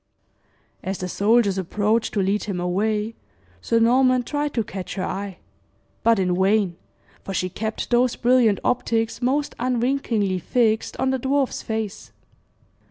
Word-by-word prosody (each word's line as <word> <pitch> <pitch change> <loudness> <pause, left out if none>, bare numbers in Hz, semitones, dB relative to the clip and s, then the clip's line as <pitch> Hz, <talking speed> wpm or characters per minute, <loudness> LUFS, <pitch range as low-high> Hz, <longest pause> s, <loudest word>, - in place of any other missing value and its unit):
As 190 0 -3
the 185 - -4
soldiers 200 0 +2
approached 210 +6 0
to 200 - +2
lead 200 +2 0
him 195 -4 -3
away, 210 +5 0 0.5
Sir 230 - +1
Norman 255 +2 +4
tried 290 +3 -2
to 230 - +1
catch 190 -2 -6
her 185 - -2
eye; 195 -1 -4 0.6
but 230 0 +4
in 185 -1 +1
vain, 195 -2 +2 0.5
for 195 - -5
she 185 - 0
kept 220 +6 -4
those 245 0 +3
brilliant 240 -4 +3
optics 230 -2 0
most 275 +4 0
unwinkingly 240 -6 0
fixed 220 +4 0
on 265 - +1
the 265 - 0
dwarf's 270 +1 0
face. 220 -3 -4
220 Hz, 145 wpm, -23 LUFS, 195-245 Hz, 0.6 s, Norman